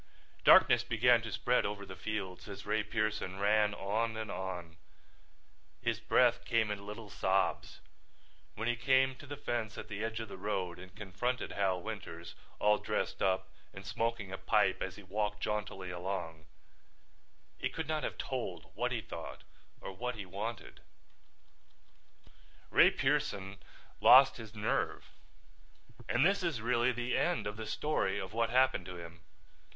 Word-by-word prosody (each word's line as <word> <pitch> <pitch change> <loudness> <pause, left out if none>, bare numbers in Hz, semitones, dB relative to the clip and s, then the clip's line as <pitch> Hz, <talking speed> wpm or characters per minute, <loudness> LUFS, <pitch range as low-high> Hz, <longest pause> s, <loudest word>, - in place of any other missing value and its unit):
Darkness 120 -1 +7
began 120 0 +4
to 115 -1 -6
spread 115 +5 +2
over 100 0 -3
the 95 - -9
fields 100 -2 -5
as 100 0 -8
Ray 110 - +1
Pearson 110 -3 -2
ran 105 +1 +3
on 110 +3 -1
and 110 -2 -4
on. 90 -4 -5 1.0
His - - -1
breath - - +3
came 110 -2 +1
in 100 -1 -5
little 105 -1 -8
sobs. 95 -1 0 0.7
When 115 +2 -3
he 120 - +2
came 130 +2 +3
to 145 - -12
the 145 0 -6
fence 120 -6 -3
at - - -7
the 105 0 -4
edge 115 0 -2
of 110 - -5
the 95 - -9
road 95 -3 -2
and 95 +1 -12
confronted 105 +6 -2
Hal 95 -2 +1
Winters, 90 -6 -7 0.2
all 105 0 +3
dressed - - -2
up 95 -1 +1 0.3
and 95 +1 -9
smoking 115 -1 -2
a 95 - -5
pipe 95 0 +2
as 95 -1 -3
he 100 - -12
walked 105 +2 -2
jauntily 100 -3 -3
along, 85 -3 -4 1.1
he - - 0
could 160 -2 -5
not 155 -1 0
have - - -4
told 130 -2 -4
what - - -1
he - - -1
thought - - -8 0.4
or - - -6
what 125 +6 -4
he 105 -3 -6
wanted. 105 +4 -6 1.9
Ray - - +7
Pearson 95 0 -1 0.4
lost 135 +2 +8
his 110 -2 -10
nerve 105 0 -1 1.0
and 125 +5 +3
this 195 +2 +3
is 170 -9 -1
really 120 +2 +2
the 120 0 -1
end 175 -1 +1
of 105 - -3
the 110 0 -6
story 150 +7 0
of 95 +2 -5
what 115 0 +1
happened 130 -7 +3
to 90 - -7
him. 85 -1 -10
105 Hz, 160 wpm, -33 LUFS, 95-115 Hz, 1.9 s, lost